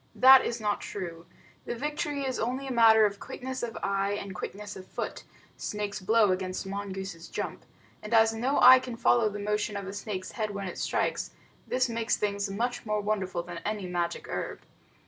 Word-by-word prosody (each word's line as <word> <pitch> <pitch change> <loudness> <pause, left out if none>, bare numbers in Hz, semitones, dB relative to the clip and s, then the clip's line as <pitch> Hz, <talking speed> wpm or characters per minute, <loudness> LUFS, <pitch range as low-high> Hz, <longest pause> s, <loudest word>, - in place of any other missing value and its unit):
That 265 0 +8
is 235 - -2
not 210 -1 -1
true. 170 -4 -6 0.4
The - - -3
victory 295 +2 -2
is 260 -1 -2
only 255 +4 -2
a 270 - -4
matter 225 -2 +7
of 200 -1 -1
quickness 260 0 -6
of 235 -2 -4
eye 200 0 0
and 200 -1 -5
quickness 205 +3 -6
of 185 0 -10
foot - - -5 0.3
snake's 210 -1 -3
blow 215 +1 +4
against 185 +1 -2
mongoose's 195 -3 -5
jump - - -5 0.4
and 210 - -8
as 225 -1 +5
no 250 +5 0
eye 255 +1 +10
can 250 -2 -7
follow 230 -2 +4
the 205 - -6
motion 210 0 -1
of 200 - -5
a 195 - -6
snake's 200 -2 -5
head 215 -2 -2
when 200 -1 -3
it 180 - -6
strikes, - - -1 0.4
this 255 0 +1
makes 230 -1 0
things 200 -1 -1
much 240 +5 -2
more 215 -1 -1
wonderful 195 -4 -1
than 175 -1 -7
any 210 +1 -3
magic 175 -1 -2
herb. - - -4
210 Hz, 190 wpm, -29 LUFS, 195-235 Hz, 0.4 s, eye